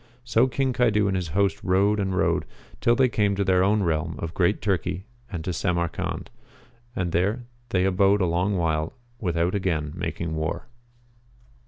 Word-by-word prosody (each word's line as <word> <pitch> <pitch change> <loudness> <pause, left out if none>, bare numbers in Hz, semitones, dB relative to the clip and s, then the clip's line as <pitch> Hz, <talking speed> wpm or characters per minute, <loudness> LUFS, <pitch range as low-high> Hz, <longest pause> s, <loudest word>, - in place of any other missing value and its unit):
So 120 +1 +3
King 130 0 0
Caidu 115 -4 +3
and 100 -1 +1
his 90 -2 -1
host 95 +3 0
rode 100 +3 +3
and 95 -2 -1
rode, - - +1 0.3
till 120 - +3
they 130 +1 +4
came 105 -4 +1
to 100 - +1
their 95 -1 +3
own 105 +1 +3
realm 80 -1 -1
of 85 0 -5
Great 90 +4 +2
Turkey 95 -1 -1 0.3
and 85 -4 -5
to 90 - -1
Samarcand; 85 -2 -2 0.6
and 95 -6 -1
there 100 +9 +1 0.3
they 95 -4 +2
abode 95 +2 +3
a 95 - +2
long 90 +4 +1
while 80 0 0 0.3
without 85 -2 0
again 80 -7 -1
making 85 -1 -3
war. 80 0 -2
95 Hz, 170 wpm, -25 LUFS, 85-105 Hz, 0.6 s, they